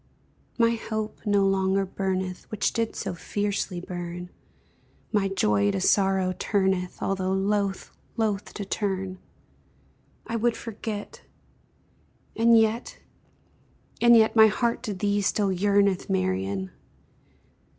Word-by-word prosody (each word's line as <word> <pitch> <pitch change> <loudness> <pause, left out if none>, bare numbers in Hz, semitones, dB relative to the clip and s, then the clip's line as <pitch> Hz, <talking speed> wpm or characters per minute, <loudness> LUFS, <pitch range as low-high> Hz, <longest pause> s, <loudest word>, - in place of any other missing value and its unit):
My 230 -1 +4
hope 220 -1 -4
no 200 -1 +3
longer 195 0 +2
burneth, 185 -1 -3
Which 215 - -1
did 230 -1 -1
so 195 - -3
fiercely 200 0 -2
burn, 175 0 -6 0.8
My 205 -3 +2
joy 105 - +2
to 100 -1 -1
sorrow 190 - +2
turneth, 190 -3 0
Although 190 -1 0
loath, 195 0 -1 0.3
loath 210 -3 -1
to 205 - -4
turn 190 -2 -3 1.1
I 230 - -2
would 235 0 +1
forget 215 -2 -6 1.1
And 230 +1 +5
yet 225 +2 +1 1.0
and 235 0 +7
yet 220 0 +4
My 220 -1 +8
heart 235 +2 0
to 205 - -3
thee 205 +2 0
still 200 0 +1
yearneth, 200 0 +2
Marian! 95 0 -1
195 Hz, 115 wpm, -26 LUFS, 185-215 Hz, 1.1 s, My